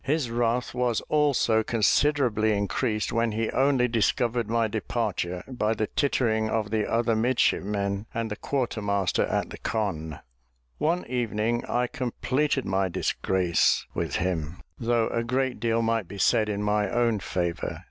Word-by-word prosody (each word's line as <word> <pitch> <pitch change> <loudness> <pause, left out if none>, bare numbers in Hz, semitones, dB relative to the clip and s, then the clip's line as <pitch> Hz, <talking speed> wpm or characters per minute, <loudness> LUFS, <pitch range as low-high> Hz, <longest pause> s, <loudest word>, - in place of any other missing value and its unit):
His 140 -4 0
wrath 120 +1 0
was 125 -2 0
also 140 -7 +3
considerably 110 -1 +2
increased 105 +2 -1
when 115 -1 +1
he 110 0 -1
only 135 -2 +3
discovered 115 0 0
my 115 -1 +2
departure 105 -5 -2
by 115 -4 -1
the 110 - 0
tittering 110 -5 0
of 110 -2 -1
the 110 -2 0
other 115 0 +2
midshipmen 105 -4 0
and 115 -1 -3
the - - -2
quarter 125 -2 -2
master 100 -3 +1
at - - -1
the - - -8
conn. 80 -8 -2 0.6
One 170 +4 0
evening, 120 -1 -1
I 125 0 0
completed 130 +3 -1
my 95 -1 0
disgrace 90 0 +1
with - - -2
him, 85 -2 -2 0.2
though 115 -1 +1
a 115 - -1
great 130 +1 -1
deal 115 +1 +1
might 115 -4 0
be 100 - -9
said 105 +2 +3
in 105 0 -2
my 105 -1 +1
own 120 -2 +1
favour. 85 -2 -3
115 Hz, 150 wpm, -26 LUFS, 105-120 Hz, 0.6 s, also